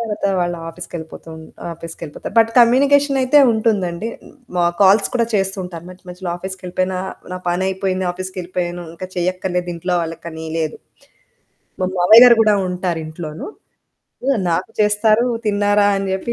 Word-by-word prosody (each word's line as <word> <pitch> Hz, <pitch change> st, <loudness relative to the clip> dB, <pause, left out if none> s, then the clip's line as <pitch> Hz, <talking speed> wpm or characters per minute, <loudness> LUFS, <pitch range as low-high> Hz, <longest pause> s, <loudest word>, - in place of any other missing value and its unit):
తరవాత 215 Hz, -3 st, -2 dB
వాళ్ళ 175 Hz, 0 st, -1 dB, 0.2 s
ఆఫీస్‌కెళ్ళిపోతూన్ 165 Hz, -1 st, -9 dB, 0.3 s
ఆఫీస్‌కెళ్ళిపోతారు, 165 Hz, 0 st, -8 dB
బట్ 225 Hz, 0 st, +5 dB
కమ్యూనికేషనయితే 275 Hz, +2 st, +4 dB
ఉంటుందండి. 210 Hz, -3 st, 0 dB
హ్మ్, -, -, -16 dB, 0.2 s
మాకు 175 Hz, 0 st, +1 dB
కాల్స్ 195 Hz, +3 st, +5 dB
కూడా 235 Hz, -2 st, +2 dB
చేస్తూ 195 Hz, 0 st, +1 dB
ఉంటారు 170 Hz, -2 st, -8 dB
మధ్య 185 Hz, +1 st, -15 dB
మధ్యలో 180 Hz, 0 st, -6 dB
ఆఫీస్‌కెళ్ళిపోయినా. 185 Hz, 0 st, -3 dB, 0.4 s
నా -, -, -4 dB
పనయిపోయింది, 190 Hz, +1 st, -1 dB
ఆఫీస్‌కెళ్ళిపోయాను, 180 Hz, -1 st, -5 dB
ఇంక 175 Hz, +2 st, -7 dB
చేయక్కర్లేదింట్లో 180 Hz, -1 st, -2 dB
వాళ్ళకనీ 165 Hz, 0 st, -7 dB
లేదు. 155 Hz, -1 st, -2 dB, 1.0 s
మా 185 Hz, -, +1 dB
మావయ్య 215 Hz, +7 st, +8 dB
గారు 240 Hz, -1 st, +8 dB
గూడా 215 Hz, -2 st, +4 dB
ఉంటారింట్లోను. 165 Hz, -3 st, -4 dB, 0.8 s
హ్మ్, 270 Hz, -4 st, +2 dB
నాకు 170 Hz, +3 st, -1 dB
చేస్తారు. 215 Hz, +3 st, +3 dB, 0.2 s
తిన్నారా 205 Hz, 0 st, +2 dB
అని 195 Hz, 0 st, -2 dB
జెప్పి, 195 Hz, +5 st, -2 dB
185 Hz, 125 wpm, -19 LUFS, 175-210 Hz, 1.0 s, మావయ్య